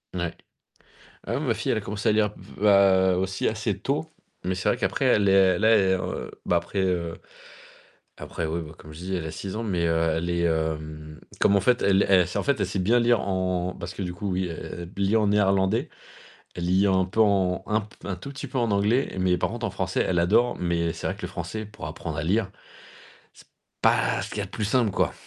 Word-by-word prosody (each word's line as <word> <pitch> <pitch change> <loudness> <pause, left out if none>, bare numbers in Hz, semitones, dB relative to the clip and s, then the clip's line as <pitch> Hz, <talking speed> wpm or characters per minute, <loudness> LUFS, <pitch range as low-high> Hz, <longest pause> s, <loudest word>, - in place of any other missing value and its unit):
Ouais. 85 -2 -2 0.9
Ah - - -2
oui, - - -2
ma - - +1
fille, - - -3
elle - - +1
a - - -2
commencé 105 +2 -2
à - - +5
lire, 105 -1 +2 0.3
heu, 95 -2 +5
aussi 95 +1 -1
assez 110 -3 -1
tôt, 140 +9 -3 0.3
mais 95 - -1
c'est 90 - -1
vrai - - 0
qu'après - - -1
elle 100 -1 +4
est 95 -2 +5
la, 110 - +3 0.3
heu, 90 - -4 0.2
bah 90 - +3
après, 85 +4 -3
heu, 90 -3 0 1.0
après 80 - -4
oui, 85 +2 -2
bah 80 -1 -9
comme 75 0 -13
je - - -11
dis, 95 +2 -3
elle 85 -3 -3
a - - -4
6 95 +5 -6
ans, 110 - -3
mais, 90 -6 0
heu, 80 0 +2
elle 85 +1 -2
est, 85 0 0
hem, 80 -1 -3 0.2
comme 100 - +4
en 100 - +3
fait 125 +4 +2
elle 100 0 +4
elle 90 -3 +5
sait 90 - -3
en - - -2
fait 140 -4 +1
elle 100 - +1
sait 95 +1 -3
bien 110 +7 +3
lire 120 -1 +3
en 90 -1 -1
parce 85 +1 -6
que 95 - -7
du 90 -2 -3
coup 95 +2 -4
oui 90 0 -1
elle 85 +1 -7
elle 100 - 0
lit 100 +3 +2
en 110 -2 +3
néerlandais, 100 0 +2 0.7
elle 85 - -3
lit 95 +3 +3
un 95 -1 +2
peu 105 +4 -2
en 95 -4 +3
un 110 0 +1
p 105 -1 -14
un 95 - -3
tout 90 - -9
petit 140 +1 -7
peu 130 0 -4
en 120 -2 +1
anglais, 105 +7 +1
mais 90 -1 +2
par - - 0
contre 120 0 -5
en 115 - -1
français, - - -1
elle 90 - +1
adore, 105 +8 +3
mais 85 -1 0
c'est 80 - -6
vrai 95 - -2
que 105 - -13
le 90 - -3
français 90 +4 -5
pour 105 - -9
apprendre 80 -3 -6
à - - -1
lire, 95 +4 0 0.8
c'est - - -19 0.3
pas - - +2
ce - - -5
qu'il - - -7
y - - 0
a - - -3
de - - -13
plus 100 - -3
simple, 110 +1 +2
quoi. - - 0
95 Hz, 245 wpm, -25 LUFS, 85-105 Hz, 1.0 s, à